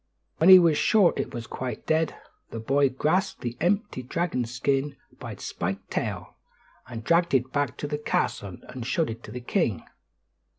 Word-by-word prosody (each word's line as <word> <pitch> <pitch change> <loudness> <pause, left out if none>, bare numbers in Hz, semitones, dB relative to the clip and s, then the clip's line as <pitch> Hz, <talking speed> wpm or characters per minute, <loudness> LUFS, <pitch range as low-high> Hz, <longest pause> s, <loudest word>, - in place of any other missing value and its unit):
When 165 - +5
he 190 - +12
was 165 -4 +4
sure 205 -5 +4
it - - -3
was 120 -1 -6
quite 130 +1 -5
dead, 160 0 +1 0.3
the 115 - -6
boy 135 +4 +2
grasped 155 +9 0
the 120 -1 -4
empty 200 - 0
dragon 130 -1 -2
skin 135 +4 -1 0.2
by - - -6
its - - -9
spiked 95 +3 -4
tail, - - -4 0.5
and 115 -3 -7
dragged 170 +2 +3
it 130 0 +1
back 145 0 -1
to 145 - -4
the 150 0 -3
castle 100 -10 -2
and 125 -2 -7
showed 155 +3 0
it 115 +1 -8
to - - -10
the 125 +2 -6
king. 120 - 0
135 Hz, 180 wpm, -26 LUFS, 120-165 Hz, 0.5 s, he